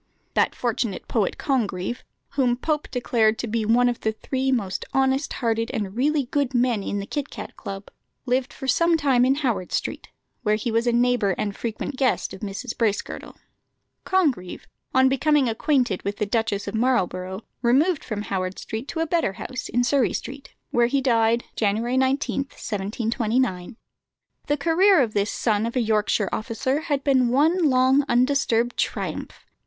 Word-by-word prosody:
That - - +2
fortunate 235 -4 -2
poet, 215 -5 0
Congreve, 225 -5 -1 0.3
whom 255 -3 +1
Pope 300 +2 -2
declared 225 -3 +1
to - - -3
be 225 -1 -1
one 240 +3 +4
of 240 -1 -1
the 220 - 0
three 265 +4 -2
most 200 -7 -1
honest 270 +1 +1
hearted 230 -1 -1
and 200 -2 -3
really 285 +3 +1
good 275 0 -1
men 240 -3 +2
in 200 - -3
the 200 - -3
Kit 290 +6 -4
cat - - -8
Club, 195 0 -8 0.3
lived 260 +2 0
for 265 - -7
some 335 +6 +3
time 265 -5 +3
in 265 +1 +3
Howard 235 -11 -1
Street, - - -3 0.3
where 215 -3 +2
he 225 +2 -2
was 230 +2 +1
a - - +4
neighbour 240 -5 +2
and 205 -1 -2
frequent 235 +4 -4
guest 260 -1 +1
of - - -8
Mrs. 210 +4 -5
Bracegirdle. 215 -3 -2 0.7
Congreve, 285 - 0 0.3
on 260 0 +5
becoming 275 +1 +3
acquainted 240 -3 +1
with 200 0 -3
the 210 - 0
Duchess 210 -1 -1
of 200 - -4
Marlborough, 190 -5 0 0.2
removed 280 +8 +3
from 210 -3 -4
Howard 185 -2 -3
Street 225 +5 -5
to 320 - -3
a - - +2
better 330 - 0
house 255 +6 -6
in 245 +2 +1
Surrey 265 -1 +2
Street, 275 +1 -7 0.2
where 240 0 +3
he 275 +3 +1
died, 235 -2 +2
January 225 +4 0
19, 265 +1 +1
1729. 220 -1 -2 0.7
The 290 - +1
career 345 +5 +4
of 235 -5 +1
this 205 0 +1
son 220 -1 0
of 235 - -6
a - - +2
Yorkshire 215 -3 +1
officer 245 +6 -1
had 285 -4 -1
been 260 -3 +3
one 310 +6 +3
long 260 +2 +4
undisturbed 245 -2 +2
triumph. - - -3
245 Hz, 170 wpm, -24 LUFS, 215-270 Hz, 0.7 s, on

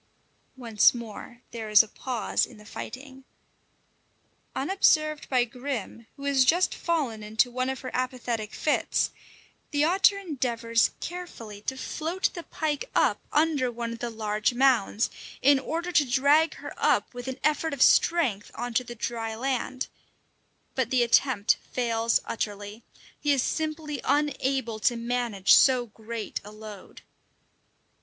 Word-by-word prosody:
Once 230 -2 +4
more 235 +1 -9
there 225 -2 -6
is 210 +1 +8
a - - -11
pause 245 +1 -1
in 240 - -15
the 210 - -15
fighting. 265 +4 -9 1.3
Unobserved 305 -2 +2
by 255 -2 +3
Grim, 245 -3 -6
who 280 - -11
has 280 -2 +3
just 345 +8 +3
fallen 285 -11 -1
into 220 +4 +1
one 255 +1 -1
of 265 - -4
her 255 - -6
apathetic 245 -4 -2
fits, 300 - 0 0.6
the 290 -1 +1
otter 385 +4 +4
endeavours 240 - 0
carefully 240 - -7
to 265 +5 -4
float 325 +7 -2
the 345 - -6
pike 315 - -3
up - - +3
under 295 -5 +2
one 235 0 -4
of 230 - -9
the 240 - -3
large 215 +1 -1
mounds, 245 -4 +2 0.3
in 280 +1 +5
order 335 +6 -3
to 305 - +4
drag 285 +6 +4
her - - -8
up - - +1
with 245 0 -7
an 260 0 -5
effort 305 +1 +1
of 280 - +3
strength 255 - +3
on 245 0 -4
to 250 - +2
dry 230 -1 -4
land; 260 +1 -2 0.9
but 260 -3 -1
the 250 -1 +3
attempt 235 -2 +3
fails 230 -2 +1
utterly: 205 0 -4 0.4
he 295 - +1
is 270 -3 +2
simply 310 -2 -3
unable 270 -5 0
to 240 +3 +2
manage 235 -4 +1
so 255 -2 +5
great 220 0 -6
a 205 - -11
load. 215 -2 -11
250 Hz, 145 wpm, -27 LUFS, 230-285 Hz, 1.3 s, is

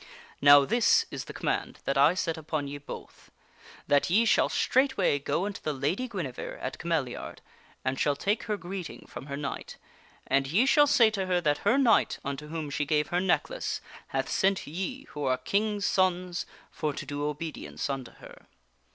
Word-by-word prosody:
Now 145 0 +8
this 245 - +4
is - - -5
the - - -8
com - - -7
mand - - -1
that 135 - 0
I 145 +5 +5
set 165 -3 -1
upon 155 -2 -3
ye 145 +1 -6
both: 145 - -10 0.6
that 145 +3 +3
ye 215 +7 +4
shall 220 - +4
straightway 255 - +2
go 170 +6 -1
unto 205 -1 -5
the 155 - -2
Lady 155 - -1
Guinevere 170 - -5
at - - -5
Cameliard 155 -7 -2 0.5
and 130 0 -1
shall 145 - +2
take 205 +9 -1
her 210 -2 -1
greeting 185 -2 -7
from 135 - -9
her 140 -1 -4
knight. 140 -1 -5 0.5
And 135 +1 +1
ye 195 - +3
shall 290 +2 +5
say 230 -5 +5
to 195 -3 -2
her 180 -1 +2
that 145 -3 +1
her 255 - +3
knight 240 -6 +4
unto 140 +2 -4
whom 155 -2 -5
she 145 - 0
gave 150 0 +1
her 175 - +1
necklace, - - 0 0.3
hath - - -2
sent 195 0 +1
ye, 190 - -4
who 150 -1 -5
are 130 -1 +2
King's 205 +8 0
sons, 180 -2 +1 0.2
for 150 -1 -2
to 145 - -6
do 145 +1 -4
obedience 150 +2 -4
unto 135 -4 -4
her. - - -15
165 Hz, 185 wpm, -28 LUFS, 145-200 Hz, 0.6 s, Now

